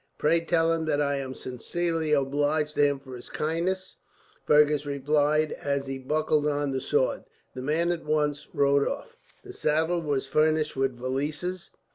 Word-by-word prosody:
"Pray 165 +3 +3
tell 165 -1 +2
him 165 -1 -1
that 150 -2 +1
I 140 -1 +1
am 130 -1 -5
sincerely 160 +5 -2
obliged 145 +2 +1
to - - +1
him 145 -1 +3
for 130 -2 -10
his 120 - -10
kindness," 170 +5 -2 0.5
Fergus 150 -1 +4
replied, 150 +2 +1
as 140 -1 -2
he 135 0 -5
buckled 150 +2 +1
on 145 -1 0
the 135 -1 -2
sword. - - 0 0.3
The 130 - -6
man 160 +6 +1
at 170 -1 -3
once 150 -1 0
rode 140 0 +3
off. 460 - -5 0.3
The 385 -1 -10
saddle 160 - +1
was 145 -4 -1
furnished 155 +2 +1
with 135 -2 0
valises. 150 +9 -3
150 Hz, 165 wpm, -27 LUFS, 140-160 Hz, 0.5 s, Fergus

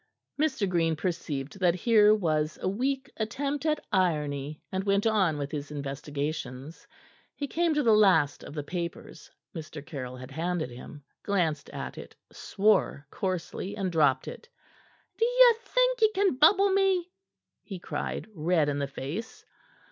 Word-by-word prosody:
Mr. 265 -9 +1
Green 165 -3 +1
perceived 155 -2 -4
that 180 -2 +3
here 215 +1 +5
was 155 -6 0
a - - -2
weak 260 +7 -1
attempt 280 +7 -2
at 305 -1 0
irony, 150 -6 0
and 190 0 -2
went 200 +1 +1
on 195 -8 +2
with 145 -1 -4
his 145 -2 -5
investigations. 140 0 -5 0.5
He 285 - -3
came 335 +1 +1
to 295 - +2
the 225 -3 +5
last 185 -9 +4
of 145 - -10
the 150 - -3
papers 170 0 -6 0.3
Mr. 155 -2 -8
Caryll 130 -5 -6
had 130 +1 -10
handed 165 -2 -2
him, 135 +4 -11 0.2
glanced 165 -8 -1
at - - -6
it, - - -11 0.2
swore 195 -8 +1
coarsely, 185 +1 -3
and 190 -3 -1
dropped 160 -3 +2
it. 470 - -9 0.7
"D'ye - - +6
think - - +1
ye 435 - +6
can 390 -3 +3
bubble 390 +8 +5
me?'" 380 -2 +2 0.5
he 195 - -8
cried, 175 - -4
red 160 -3 +1
in 145 0 -2
the 140 - -1
face. 145 - -6
180 Hz, 150 wpm, -28 LUFS, 150-235 Hz, 0.7 s, D'ye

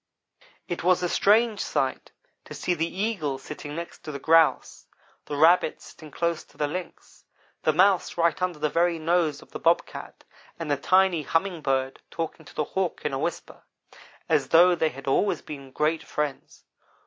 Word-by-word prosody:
"It 175 - -4
was 180 0 +3
a - - +2
strange 215 +2 +3
sight 130 -1 -2 0.3
to - - -9
see 180 - -1
the 165 -1 -1
Eagle 185 -9 -2
sitting 145 +2 -8
next 170 +1 -7
to 155 - -8
the 140 - -5
Grouse; 160 +2 +2 0.4
the 145 - -5
Rabbit 160 +2 +4
sitting 155 - -13
close 170 +2 -2
to - - -24
the 150 - 0
Lynx; 180 +3 -8 0.4
the 155 - +3
Mouse 185 +3 +3
right 170 0 +1
under 180 -3 -1
the 150 0 0
very 170 +2 +1
nose 160 -2 0
of - - -23
the - - -6
Bobcat, 170 +1 -1 0.3
and 165 -3 -4
the - - +3
tiny 185 +3 +3
Humming 165 +3 -1
bird 135 -1 -1
talking 165 -1 -5
to - - -15
the 150 - 0
Hawk 185 +3 -3
in 150 - -1
a 135 - -1
whisper, - - -4 0.7
as - - +2
though 175 +2 +6
they 160 -2 +1
had 135 -2 -11
always 140 +9 +1
been 140 -3 -9
great 155 +4 0
friends. 150 -2 -5
165 Hz, 180 wpm, -26 LUFS, 150-180 Hz, 0.7 s, though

